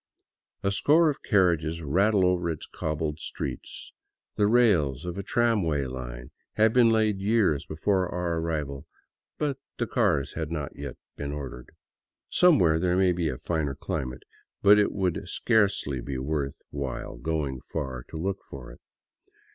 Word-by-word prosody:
A 100 - +2
score 150 - +4
of 140 - -9
carriages 85 -5 +2
rattle 95 +6 +3
over 90 -1 +1
its 80 -3 -4
cobbled 75 0 -3
streets; - - -6 0.4
the 105 - +3
rails 95 - +3
of 90 -1 -4
a 100 - -3
tramway 100 -10 +1
line 60 -1 -7 0.2
had 110 0 +3
been 120 -2 +6
laid 110 -3 +2
years 100 -8 +2
before 90 +3 0
our 85 -2 -1
arrival, 75 -4 -3 0.5
but 140 -3 -1 0.2
the 120 - 0
cars 100 - +1
had 80 -2 -3
not 75 -4 -4
yet 70 -2 -7 0.2
been 70 -1 -4
ordered. 65 -4 -7 0.6
Somewhere 90 - +5
there 90 +1 +1
may 95 -1 +4
be 85 -2 0
a 65 - -4
finer 75 -1 -2
cli - - -3
mate, 65 0 -8 0.4
but 105 +1 +7
it 105 - +2
would 95 -4 -2
scarcely 100 - +1
be 70 +1 -4
worth 70 +1 -3
while 70 -3 -5
going 75 -5 -2
far 65 -5 -5
to - - -7
look 95 +4 -2
for 65 -3 -9
it. - - -15
85 Hz, 155 wpm, -27 LUFS, 70-100 Hz, 0.6 s, but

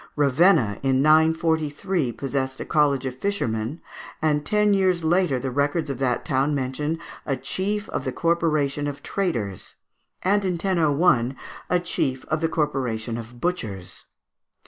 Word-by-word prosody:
Ravenna, 140 - +3
in 135 0 +2
943, 160 -1 +2
possessed 130 +2 -3
a - - -4
College 140 -3 +2
of 130 -1 -3
Fishermen; 130 - -2 0.4
and 150 -2 +1
ten 210 +3 +2
years 185 -3 +2
later 170 -3 +2
the 130 +1 -3
records 145 +3 0
of 135 - -6
that 125 -3 0
town 135 +3 +1
mention 140 +4 -2 0.3
a 135 -2 -1
Chief 205 +9 -2
of - - -3
the 130 - -2
Corporation 155 -3 0
of 145 -1 -6
Traders, 115 - -3 0.5
and, 200 +2 +2
in 185 -2 0
1001, 165 -7 +2 0.3
a 180 - +3
Chief 135 -7 -2
of 155 0 0
the 165 - +1
Corporation 125 -8 -1
of 120 +1 -8
Butchers. 110 - -4
145 Hz, 145 wpm, -24 LUFS, 130-170 Hz, 0.5 s, Ravenna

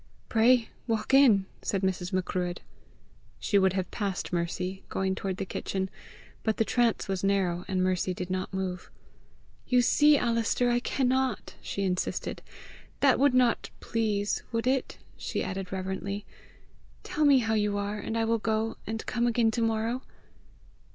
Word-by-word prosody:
"Pray 235 +1 +4 0.2
walk 225 +2 -1
in!" 240 -8 +6 0.2
said 195 -1 -1
Mrs. 185 -1 -1
Macruadh. 180 -1 -2 0.8
She 205 - +2
would 190 -1 +3
have 190 -1 -2
passed 195 -4 -3
Mercy, 180 +2 -2
going 190 0 0
toward 190 -1 -3
the - - -3
kitchen, 190 0 -3 0.5
but 220 -1 0
the 225 - +2
TRANCE 240 -1 +1
was 190 -1 -2
narrow, 185 -3 +1
and 185 -1 0
Mercy 185 0 +1
did 180 0 -5
not 185 0 -2
move. 185 -2 -4 0.8
"You 250 -1 +4
see, 295 +4 +5
Alister, 235 0 +1
I 240 - +3
cannot!" 260 -2 0
she 200 - -3
insisted. 180 -1 -2 0.6
"That 275 -3 +5
would 280 -1 +4
not 250 -2 +3
please, 210 -3 -1
would 230 0 -1
it?" 260 0 0 0.2
she - - -3
added 190 -1 -4
reverently. 190 +2 -4 0.8
"Tell 335 -4 -1
me 285 -2 +7
how 220 -3 +1
you 210 -1 +1
are, 205 +1 -2
and 225 +2 -3
I 225 - +1
will 230 0 +1
go, 220 +1 -1
and 225 0 -4
come 240 0 0
again 230 -1 +3
to 235 - -2
morrow." 225 +2 0
210 Hz, 160 wpm, -28 LUFS, 190-235 Hz, 0.8 s, me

